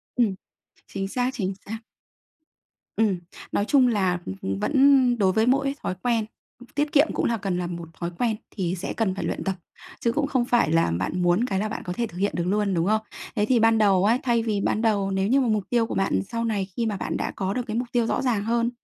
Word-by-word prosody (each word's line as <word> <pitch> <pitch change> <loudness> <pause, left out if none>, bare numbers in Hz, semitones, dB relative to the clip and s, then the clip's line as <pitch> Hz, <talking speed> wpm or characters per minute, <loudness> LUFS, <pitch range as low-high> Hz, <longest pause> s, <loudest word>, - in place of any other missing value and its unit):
Ừm. 230 -6 +2 0.5
Chính 195 -1 -4
xác, 250 +5 0
chính 195 -7 -2
xác. 225 +2 -5 1.2
Ừm. 210 -5 +2 0.3
Nói 205 - +1
chung 265 0 +4
là, 190 -6 +1 0.2
ừm, 95 0 -2
vẫn 265 - +4
đối 195 -4 +3
với 220 +3 +2
mỗi 275 +2 +2
thói 185 - -2
quen 230 -3 +1 0.5
tiết 295 0 0
kiệm 290 +2 +5
cũng - - 0
là 235 - +1
cần 195 -3 -2
là 180 -1 -2
một 170 -1 -6
thói 170 0 -3
quen 235 -3 +1 0.2
thì 180 -3 -1
sẽ 180 - -4
cần 205 -5 0
phải 195 - -4
luyện - - -3
tập 190 -1 -1 0.4
chứ 235 - +1
cũng 290 +2 0
không 255 -4 +1
phải 240 -9 +2
là 165 - +3
bạn 95 - -2
muốn 175 +6 +3
cái 195 -6 -1
là 215 +2 -1
bạn - - -5
có 180 - -3
thể 235 +5 -1
thực 175 - -12
hiện 200 +2 +1
được 175 - 0
luôn, 205 0 +1
đúng 170 0 +1
không? 215 +1 +2 0.3
Thế 210 - +2
thì 245 +2 +3
ban 225 0 +4
đầu 200 -3 +4
ấy, 230 +4 +3
thay 235 -2 +2
vì 215 -3 -1
ban 215 - 0
đầu 205 -4 +1
nếu 190 0 0
như 265 +5 +4
mà 255 - +1
mục 215 -3 +1
tiêu 235 -2 +2
của - - -4
bạn 195 - +1
sau 230 0 -2
này 210 -4 0
khi 235 - +1
mà 210 -3 -1
bạn - - -3
đã - - -2
có 190 0 -2
được 250 - -1
cái 215 0 -2
mục 245 +1 -1
tiêu 240 -3 +2
rõ - - 0
ràng 235 -6 0
hơn, 235 +2 +1
215 Hz, 250 wpm, -25 LUFS, 190-240 Hz, 1.2 s, kiệm